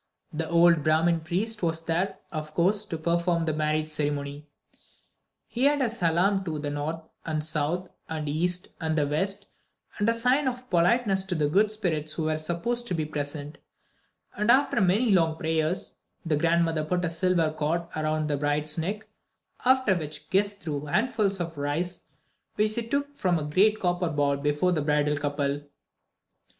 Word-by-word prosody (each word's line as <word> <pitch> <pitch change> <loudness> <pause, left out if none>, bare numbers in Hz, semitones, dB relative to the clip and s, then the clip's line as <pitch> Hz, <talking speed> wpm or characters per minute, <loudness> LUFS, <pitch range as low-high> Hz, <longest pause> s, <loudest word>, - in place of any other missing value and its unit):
The 160 +1 -3
old 170 -1 +5
Brahmin 165 +2 +3
priest 195 +7 -2
was 165 -1 -1
there, 170 +4 -1
of 155 -1 -5
course, 200 +5 +3
to 165 - -4
perform 170 +1 +1
the 155 - 0
marriage 155 0 0
ceremony. 145 -1 -3 1.0
He 255 +4 +1
made 290 0 +2
a 240 - +1
salaam 195 -1 +1
to 160 -3 -3
the 145 -1 -3
north 150 +3 -3 0.2
and 155 -2 -2
south 160 +4 -1 0.2
and 155 -1 -3
the - - -1
east 180 +2 0
and 160 -1 -1
the 150 - +3
west, 195 +8 0 0.5
a 205 +2 +3
sign 250 +5 +2
of 250 0 -3
politeness 190 +3 +3
to 190 -2 -2
the 150 -2 +1
"good 200 +8 +3
spirits" 160 -8 -2
who 165 - -3
were 155 0 0
supposed 235 +10 -2
to 180 - 0
be 155 -2 -1
present; 145 0 -5 0.8
and, 210 +2 -1
after 260 -2 +4
many 205 +6 +3
long 165 -4 +3
prayers, 160 +2 -1 0.3
the 160 -2 +1
grandmother 165 0 +2
put 180 +3 -1
a - - 0
silver 170 -2 +1
cord 155 +3 -1
around 155 0 -1
the 145 -1 0
bride's 150 +2 0
neck, 205 +6 -3 0.6
after 260 -5 +4
which 155 -3 -5
the - - -30
guests 200 +1 +2
threw 150 -3 -3
handfuls 205 - +1
of 165 -3 -4
rice 160 +5 -2 0.5
which 215 0 +2
they 235 - 0
took 285 +5 -2
from 180 -9 +1
a 155 - -3
great 200 +9 +3
copper 175 -1 0
bowl 145 -2 +1
before 145 +5 +1
the 160 -4 +1
bridal 150 0 +1
couple. 145 0 -1
165 Hz, 175 wpm, -27 LUFS, 155-195 Hz, 1.0 s, old